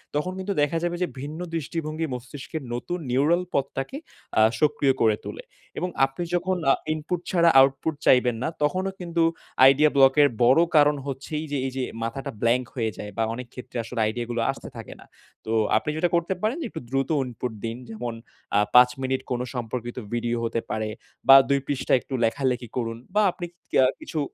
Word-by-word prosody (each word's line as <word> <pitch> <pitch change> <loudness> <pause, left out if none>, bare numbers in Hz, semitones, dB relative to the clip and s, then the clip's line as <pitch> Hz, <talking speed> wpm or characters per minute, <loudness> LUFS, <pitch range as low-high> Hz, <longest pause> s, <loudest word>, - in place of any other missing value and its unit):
তখন 150 +5 0
কিন্তু 195 +2 -2
দেখা 145 +3 +1
যাবে 175 0 -1
যে 180 - +2
ভিন্ন 150 +4 -6 0.2
দৃষ্টিভঙ্গি 160 0 -3
মস্তিষ্কের 135 +5 -7
নতুন 175 +9 -3
নিউরাল 155 +8 +3
পথটাকে 140 - -2 0.4
আ - - +6 0.2
সক্রিয় 150 -2 +3
করে 110 -2 +4
তোলে - - -7 0.3
এবং 180 - -1 0.2
আপনি 135 +6 -5
যখন 185 +1 0
আ - - +6 0.2
ইনপুট 155 +3 -3
ছাড়া 170 -2 +5
আউটপুট 135 +4 +3
চাইবেন 125 -2 +4
না, - - 0 0.2
তখনও 185 +6 0
কিন্তু 170 -1 0 0.4
আইডিয়া 140 +3 +6
ব্লক 135 -1 +6
এর 145 - +7 0.2
বড় 130 +7 +6
কারণ 150 0 +6
হচ্ছে 135 +1 -6
এইযে, 145 -2 -3
এইযে 130 0 -3 0.2
মাথাটা 135 +5 -4
ব্ল্যাংক 120 +2 +2
হয়ে 115 -3 -1
যায় 105 0 -7
বা 115 - +2
অনেক 125 +1 -7
ক্ষেত্রে 125 -1 -8
আসলে 115 +1 -6
আইডিয়া 115 +2 -2
গুলো 120 -1 -1
আসতে - - -10
থাকে - - -8
না। - - -15 0.4
তো 110 - -4 0.3
আপনি 110 - -2
যেটা 175 +2 +2
করতে 170 +2 +1
পারেন 220 +7 0
একটু - - -7
দ্রুত 135 +1 0 0.2
ইনপুট 125 0 -5
দিন 115 +1 -4
যেমন 115 +2 -5 0.4
আ - - +5 0.2
৫ 125 0 +9
মিনিট 130 0 -1
কোন 125 -1 0
সম্পর্কিত 120 0 -4 0.2
ভিডিও 120 0 -1
হতে 115 0 -1
পারে 110 0 -2 0.4
বা 135 - +10
২ 140 - +3
পৃষ্ঠায় 130 -2 +1
একটু - - -10
লেখালেখি 125 +1 -1
করুন 115 -2 -2 0.2
বা 210 - +5
আপনি 175 - -6 0.3
কে - - +3 0.2
কিছু 155 - -4
135 Hz, 185 wpm, -25 LUFS, 120-160 Hz, 0.4 s, বা